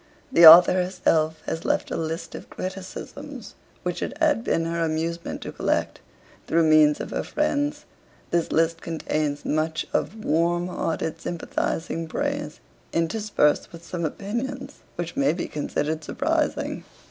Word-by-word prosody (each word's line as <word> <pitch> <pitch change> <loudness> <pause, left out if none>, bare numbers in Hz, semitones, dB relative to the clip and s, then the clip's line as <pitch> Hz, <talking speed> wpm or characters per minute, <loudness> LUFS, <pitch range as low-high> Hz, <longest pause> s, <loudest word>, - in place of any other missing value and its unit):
The 170 -10 +9
author 175 +3 +10
herself 180 -4 +1
has 165 - -3
left - - 0
a - - -1
list 165 +1 -4
of - - -9
criticisms 185 0 -7 0.3
which - - -3
it - - -4
had 300 -7 +2
been 165 - 0
her 165 0 -1
amusement 165 +1 -2
to - - -6
collect, - - -1 0.5
through 165 0 +3
means 155 -1 +5
of - - -5
her - - -1
friends. 295 0 -1 0.5
This 170 -1 0
list 165 0 +1
contains 155 -3 -2
much 155 +1 0
of 215 +1 -2
warm 170 +3 +1
hearted 165 -2 -3
sympathising 165 -1 -3
praise, 285 - -3 0.3
interspersed 165 -2 +1
with 170 0 -12
some 175 -2 -4
opinions 250 - -4 0.2
which 175 0 -5
may 140 +2 +2
be 170 - -4
considered 155 +1 -2
surprising. - - -1
165 Hz, 140 wpm, -24 LUFS, 160-190 Hz, 0.5 s, author